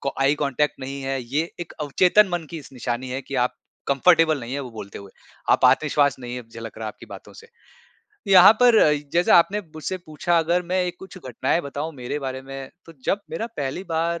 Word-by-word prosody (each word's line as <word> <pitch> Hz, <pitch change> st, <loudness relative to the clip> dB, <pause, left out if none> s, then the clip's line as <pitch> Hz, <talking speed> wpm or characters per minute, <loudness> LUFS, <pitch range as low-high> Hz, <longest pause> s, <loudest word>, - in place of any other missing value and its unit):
को 140 Hz, -, -2 dB
eye 140 Hz, +2 st, +4 dB
contact 145 Hz, 0 st, 0 dB
नहीं 135 Hz, +1 st, -6 dB
है। 135 Hz, 0 st, -2 dB
ये 145 Hz, +8 st, -2 dB
एक 170 Hz, -, -7 dB
अवचेतन 180 Hz, +7 st, +4 dB
मन 175 Hz, -2 st, -3 dB
की 165 Hz, -, -6 dB
इस 140 Hz, -, -13 dB
निशानी 125 Hz, 0 st, -4 dB
है 130 Hz, +2 st, -3 dB
कि 140 Hz, -, -8 dB
आप 125 Hz, -, -3 dB, 0.3 s
कम्फर्टेबल 160 Hz, +2 st, +4 dB
नहीं 120 Hz, +1 st, -7 dB
है 140 Hz, -, -2 dB
वो 130 Hz, -3 st, -7 dB
बोलते 105 Hz, -3 st, -9 dB
हुए, 100 Hz, -1 st, -12 dB, 0.4 s
आप -, -, +3 dB
आत्मविश्वास 145 Hz, +1 st, +3 dB
नहीं 125 Hz, 0 st, -6 dB
झलक 115 Hz, 0 st, -10 dB
रहा 110 Hz, -, -5 dB
है -, -, -2 dB
आपकी -, -, -15 dB
बातों -, -, -11 dB
से। 460 Hz, -, -15 dB, 0.8 s
यहाँ 190 Hz, +1 st, +9 dB
पर 245 Hz, -2 st, +6 dB
अ -, -, +5 dB
इ 150 Hz, -1 st, 0 dB
जैसा 175 Hz, +1 st, +5 dB
आपने 195 Hz, +5 st, +3 dB
मुझसे 155 Hz, +4 st, -4 dB
पूछा 170 Hz, +1 st, -1 dB
अगर 170 Hz, +2 st, +1 dB
मैं 180 Hz, +1 st, -2 dB
एक 175 Hz, 0 st, -4 dB
कुछ 190 Hz, 0 st, -12 dB
घटनाएँ 130 Hz, +2 st, -1 dB
बताऊँ 145 Hz, +3 st, -5 dB
मेरे 125 Hz, +2 st, -4 dB
बारे 130 Hz, -2 st, -5 dB
में, 135 Hz, 0 st, -8 dB, 0.2 s
तो 165 Hz, -, -12 dB
जब 200 Hz, -, 0 dB
मेरा 225 Hz, -, -3 dB
पहली 140 Hz, +5 st, -3 dB
बार 170 Hz, 0 st, -1 dB
145 Hz, 220 wpm, -23 LUFS, 130-170 Hz, 0.8 s, यहाँ